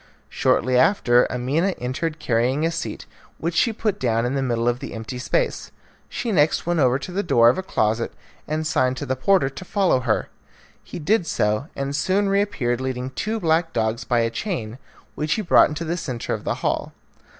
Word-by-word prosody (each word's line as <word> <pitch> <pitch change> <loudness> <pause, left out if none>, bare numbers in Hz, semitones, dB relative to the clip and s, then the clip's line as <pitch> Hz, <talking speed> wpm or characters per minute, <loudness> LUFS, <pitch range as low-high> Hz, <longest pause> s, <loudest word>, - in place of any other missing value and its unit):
Shortly 130 +1 +2
after 125 -6 +4
Amina 145 +10 0
entered 150 +6 -3
carrying 130 +2 +1
a 165 - +1
seat, 165 - -5 0.3
which 170 +1 -2
she 230 +8 +3
put 210 -2 -2
down 115 -1 +1
in 125 - -1
the 135 - 0
middle 120 -2 0
of 120 0 +1
the - - -7
empty 115 +3 -6
space. - - -1 0.4
She 235 - -3
next 155 -5 +2
went 175 -1 0
over 130 -2 +3
to 140 - -7
the 195 +3 -1
door 120 -10 +5
of 125 - +1
a - - -1
closet 110 - 0 0.4
and 155 +1 -2
signed 130 -4 +1
to 145 - -4
the 130 -1 -1
porter 150 +2 +3
to 135 +7 -7
follow 190 -7 +2
her. 120 -4 -1 0.5
He - - -8
did 175 +3 +1
so, 105 +4 0
and 140 +1 -3
soon 195 +6 +1
reappeared 150 -12 0
leading 130 0 -3
two 215 +11 -2
black 165 -1 +1
dogs 110 +1 -1
by 120 -2 +1
a 115 0 0
chain, 120 - -4 0.3
which 150 0 -1
he 215 - -2
brought 170 - +5
into 155 +2 -4
the 170 +2 -2
centre 130 -9 -4
of - - -5
the - - 0
hall. - - -1
140 Hz, 200 wpm, -23 LUFS, 120-175 Hz, 0.5 s, door